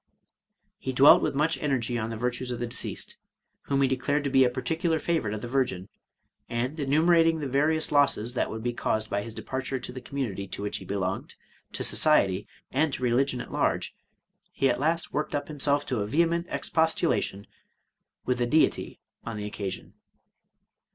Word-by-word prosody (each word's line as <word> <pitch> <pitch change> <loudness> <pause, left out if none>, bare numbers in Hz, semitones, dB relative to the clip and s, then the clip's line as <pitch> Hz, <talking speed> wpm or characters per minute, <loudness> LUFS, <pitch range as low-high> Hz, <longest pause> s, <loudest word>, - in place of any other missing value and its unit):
He 130 - -3
dwelt 135 +3 +8
with - - -1
much 155 +3 +1
energy 130 -5 0
on 110 -1 -2
the 115 - -4
virtues 125 +2 -2
of 120 - -3
the 120 - -2
deceased, 115 - -3 0.5
whom 140 0 +2
he - - +4
declared 140 +3 0
to 140 - -1
be 135 -1 +6
a 125 - +4
particular 160 +6 -1
favorite 155 -10 -1
of 105 - -6
the - - -3
Virgin; 120 -8 -1 0.6
and 125 +6 -2
enumerating 165 +3 +4
the 150 - -3
vari6us 150 +4 +1
losses 135 -5 +2
that 125 - 0
would 110 0 -6
be 120 0 -1
caused 110 -2 -1
by 100 - 0
his 110 +1 -7
departure 135 0 -3
to 125 - -6
the 130 0 -8
community 120 -7 -4
to 100 - -6
which 105 - -2
he - - -10
belonged, 95 -1 -3 0.4
to - - -3
society, 100 -11 +3 0.2
and 145 +2 +1
to 130 - -4
religion 125 +1 +2
at - - -9
large; - - 0 0.6
he 135 - +1
at 120 - -2
last 165 +4 0
worked 150 0 -1
up 145 - -3
him 150 - -9
self 145 +1 +2
to 125 -4 -1
a 100 - -1
vehement 170 +6 +1
expostulation 160 - 0 0.8
with 125 -1 0
the 120 - +1
Deity 155 +5 +2 0.2
on 115 -2 -5
the 105 - -4
oc 105 - -6
casion. 100 -2 -5
130 Hz, 190 wpm, -27 LUFS, 115-150 Hz, 0.8 s, dwelt